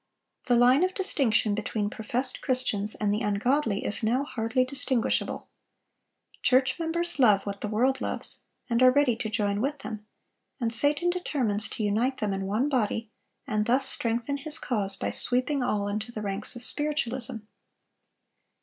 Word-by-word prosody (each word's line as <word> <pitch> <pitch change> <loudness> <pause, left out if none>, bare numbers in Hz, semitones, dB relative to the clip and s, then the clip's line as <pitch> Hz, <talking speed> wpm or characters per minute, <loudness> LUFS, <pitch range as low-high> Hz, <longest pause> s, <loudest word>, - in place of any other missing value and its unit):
The 245 - +3
line 250 +6 +5
of 370 0 0
distinction 245 - +1
between 210 0 -2
professed 245 +4 0
Christians 220 -6 0
and 205 -1 0
the 210 - -1
ungodly 215 +1 0
is 210 - 0
now 240 +5 +1
hardly 250 -1 -1
distinguishable. 265 -3 -1 0.9
Church 260 +2 +2
members 340 0 -2
love 210 -6 +4
what 200 -1 -5
the - - -2
world 250 +6 +1
loves, - - -1 0.3
and 235 0 0
are 255 - +8
ready 275 -3 +3
to 225 -2 -3
join 205 -2 -1
with 285 +4 -1
them; 215 -1 -7 0.5
and 230 -2 -1
Satan 290 +8 +2
determines 240 - -1
to 220 - -4
unite 230 +6 0
them 205 -2 -2
in 195 0 -3
one 220 +8 0
body, 225 -4 -1 0.3
and 215 0 -1
thus 260 +3 +2
strengthen 235 +4 -1
his 305 +2 +2
cause 200 -6 0
by - - -3
sweeping 255 +3 +3
all 210 -5 -1
into 215 +3 -4
the 215 -2 -6
ranks 200 +4 -1
of 240 - -7
Spiritualism. 265 -5 0
240 Hz, 160 wpm, -27 LUFS, 210-270 Hz, 0.9 s, are